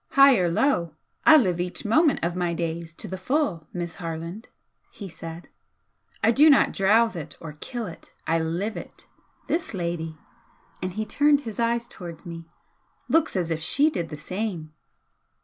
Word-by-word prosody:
"High 275 -2 +7
or 175 -1 +2
low, 170 - +1 0.3
I 315 -1 +10
live 185 - +2
each 180 +4 -3
moment 305 +8 +3
of 170 +1 0
my 175 -2 -1
days 165 0 -4
to 210 - -5
the 190 0 -6
full, 190 - -1
Miss 175 -2 -4
Harland," 165 +5 -5 0.4
he 200 - -9
said 165 -1 -9 0.8
"I 225 - +5
do 295 +6 +6
not 280 - +5
drowse 220 +3 +3
it 165 -4 -7
or 155 -2 -8
kill 240 +4 -5
it 165 -4 -11
I 165 0 +2
LIVE 175 +7 -2
it! - - -10 0.4
This 325 - -2
lady," 170 -3 -3 0.6
and 185 0 -3
he 215 +2 -2
turned 290 +5 +3
his 225 -5 -7
eyes 235 0 +1
towards 175 -5 -10
me 165 -1 -7 0.6
"looks 325 -6 +2
as 175 -3 -1
if 160 0 -1
she 285 - +3
did 170 - -3
the 150 - -7
same!" 180 -4 -4
180 Hz, 170 wpm, -25 LUFS, 165-235 Hz, 0.8 s, I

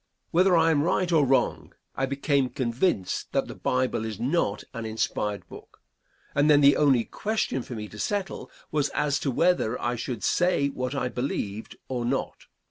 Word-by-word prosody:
Whether 180 +1 +4
I 165 0 +4
am 145 -3 +3
right 175 +3 +1
or 160 -3 +5
wrong, 135 0 0 0.2
I 135 - 0
became 140 -1 +1
convinced 120 - -1
that - - +1
the - - -7
Bible 130 -3 -1
is 110 -3 -5
not 125 -6 0
an 115 - -5
inspired 105 -2 -2
book; - - -13 0.5
and 145 +2 +3
then 145 -1 +6
the 140 0 +7
only 135 -6 +4
question 210 - -2
for 120 - -7
me 105 -1 -5
to 105 - -12
settle 200 - -3 0.2
was 145 -2 +1
as 145 -1 +1
to 140 - -1
whether 135 -4 +1
I 120 0 -1
should 120 0 -5
say 175 -6 +2
what 130 0 -4
I 135 - 0
believed 115 -5 -4
or 125 -2 -2
not. 120 - -3
135 Hz, 180 wpm, -26 LUFS, 120-155 Hz, 0.5 s, the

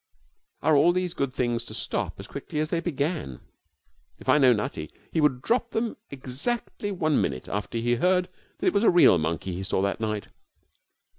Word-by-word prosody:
Are 155 - +4
all 160 +5 +5
these 180 -1 -1
good 140 -2 -1
things 120 -2 -1
to - - -8
stop - - -3
as - - -7
quickly - - -7
as 155 +1 -1
they 170 - +1
began? 145 - -2 0.8
If - - -15
I 150 - +5
know 130 -3 +6
Nutty, 105 -8 -2 0.2
he 160 - +1
would 135 -4 +2
drop 240 0 +1
them 225 0 -2
exactly 140 - -3
one 155 -5 +1
minute 65 -2 -2
after 105 +3 -3
he 120 +1 +1
heard 180 +4 +2 0.3
that - - -4
it - - +3
was 200 +1 +2
a - - +6
real 175 - +6
monkey 85 +4 -2
he 95 +2 -4
saw 95 - -1
that 100 - -1
night. 105 -2 -3
140 Hz, 195 wpm, -26 LUFS, 110-175 Hz, 0.8 s, know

